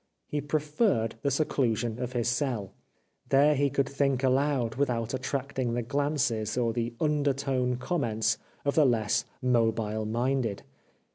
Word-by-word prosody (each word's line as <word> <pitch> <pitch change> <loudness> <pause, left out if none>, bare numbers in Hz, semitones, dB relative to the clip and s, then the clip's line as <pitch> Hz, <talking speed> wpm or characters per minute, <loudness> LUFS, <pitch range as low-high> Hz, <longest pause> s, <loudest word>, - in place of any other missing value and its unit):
He 150 - -3
preferred 150 - 0
the 140 - +1
seclusion 125 -5 0
of 125 0 -3
his 120 -2 0
cell. 120 -5 -1 0.6
There 145 +2 +5
he 140 0 +2
could 140 +1 0
think 140 -2 0
aloud 130 -3 +2
without 120 -4 -1
attracting 130 -2 -2
the 120 - -1
glances 125 -5 0
or 115 -2 +1
the 120 0 -2
undertone 140 -4 +1
comments 120 -6 0 0.3
of 140 - +2
the 155 - +5
less 110 -4 +1 0.2
mobile 115 -3 +1
minded. 120 -1 -1
125 Hz, 135 wpm, -28 LUFS, 115-140 Hz, 0.6 s, There